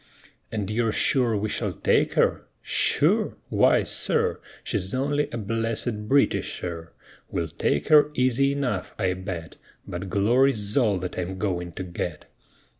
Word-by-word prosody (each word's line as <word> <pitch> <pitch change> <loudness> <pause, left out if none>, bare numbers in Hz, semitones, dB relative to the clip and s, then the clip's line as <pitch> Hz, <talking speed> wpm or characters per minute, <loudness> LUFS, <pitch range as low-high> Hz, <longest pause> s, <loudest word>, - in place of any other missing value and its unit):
"And 105 -2 -3
you're 115 0 +1
sure 120 -1 +2
we 105 +2 -1
shall - - -2
take - - +1
her?" - - +1 0.2
"Sure? - - +2
Why, - - +4
sir, - - 0 0.2
She's 95 +2 -1
only 145 +3 0
a 120 - -4
blessed 115 0 -2
Britisher! 85 -10 0 0.4
We'll 85 -2 -2
take 75 -1 -1
her 150 -1 +7
easy 130 +2 +2
enough, 125 -10 -3
I 95 -1 +1
bet; 90 -3 -6 0.3
But 90 +2 -5
glory's 105 +1 +2
all 110 -8 +3
that 90 0 -4
I'm 90 +1 -4
going 90 -4 -2
to 95 - -5
get!" 85 -3 -5
105 Hz, 140 wpm, -25 LUFS, 90-125 Hz, 0.4 s, her